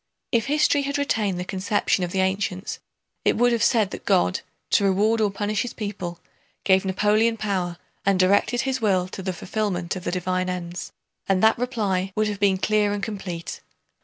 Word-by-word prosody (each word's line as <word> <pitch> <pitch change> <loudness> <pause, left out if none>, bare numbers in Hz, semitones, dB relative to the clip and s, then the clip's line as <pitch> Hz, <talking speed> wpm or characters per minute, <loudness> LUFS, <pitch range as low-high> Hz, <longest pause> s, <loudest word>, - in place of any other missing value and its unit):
If 235 +1 +1
history 290 0 +3
had 280 +1 -2
retained 215 -10 0
the 180 - -3
conception 190 0 0
of 175 - -2
the 190 - +1
ancients 190 0 -1 0.4
it - - +2
would 245 +1 +4
have 235 -2 +1
said 220 -6 +3
that - - -7
God, 90 +1 +2 0.3
to - - +4
reward 210 +4 +3
or 210 - +3
punish 205 +1 -1
his 245 - -5
people, 185 -5 -5 0.4
gave 190 -1 +4
Napoleon 210 +4 +2
power 185 -5 -2 0.3
and 195 -1 +2
directed 205 +6 +3
his 265 -2 -2
will 190 -4 +2
to 190 - -7
the 185 0 -2
fulfillment 185 -1 -2
of 185 - -6
the 175 - -2
divine 185 0 -1
ends, 175 -1 -5 0.4
and 195 0 +2
that 220 +1 +5
reply 200 -7 -1
would 215 0 +1
have 205 -1 -4
been 200 -2 +3
clear 210 +1 +2
and 205 -1 -4
complete. 185 -6 -5
200 Hz, 190 wpm, -24 LUFS, 185-215 Hz, 0.4 s, that